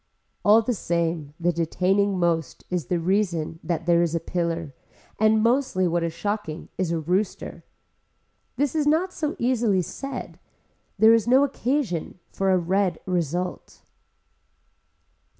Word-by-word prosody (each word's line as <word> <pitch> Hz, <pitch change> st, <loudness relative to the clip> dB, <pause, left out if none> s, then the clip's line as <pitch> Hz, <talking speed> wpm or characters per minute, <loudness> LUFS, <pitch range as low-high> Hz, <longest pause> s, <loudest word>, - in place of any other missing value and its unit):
All 220 Hz, +2 st, +6 dB
the 245 Hz, -, 0 dB
same 165 Hz, -6 st, -2 dB
the 175 Hz, +1 st, +2 dB
detaining 185 Hz, +4 st, +1 dB
most 170 Hz, -4 st, -1 dB
is 175 Hz, -8 st, -2 dB
the 175 Hz, -, 0 dB
reason 170 Hz, -3 st, 0 dB
that 165 Hz, 0 st, -2 dB
there 170 Hz, -1 st, +4 dB
is 170 Hz, -1 st, 0 dB
a -, -, +1 dB
pillar 165 Hz, -3 st, -3 dB, 0.5 s
and 215 Hz, 0 st, +4 dB
mostly 235 Hz, -6 st, +2 dB
what 170 Hz, 0 st, 0 dB
is 165 Hz, 0 st, -1 dB
shocking 205 Hz, -4 st, -4 dB
is 185 Hz, -3 st, -1 dB
a 170 Hz, -, 0 dB
rooster. 180 Hz, +6 st, -2 dB, 0.9 s
This 285 Hz, 0 st, 0 dB
is 305 Hz, -2 st, 0 dB
not 340 Hz, +5 st, +2 dB
so 300 Hz, -1 st, -2 dB
easily 235 Hz, -6 st, +1 dB
said. 275 Hz, +7 st, -7 dB, 0.6 s
There 220 Hz, +3 st, +7 dB
is 230 Hz, -1 st, +2 dB
no 260 Hz, +3 st, +5 dB
occasion 255 Hz, -, -1 dB
for 195 Hz, 0 st, 0 dB
a 185 Hz, -, +4 dB
red 180 Hz, 0 st, 0 dB
result. 180 Hz, 0 st, -3 dB
185 Hz, 140 wpm, -24 LUFS, 170-220 Hz, 0.9 s, There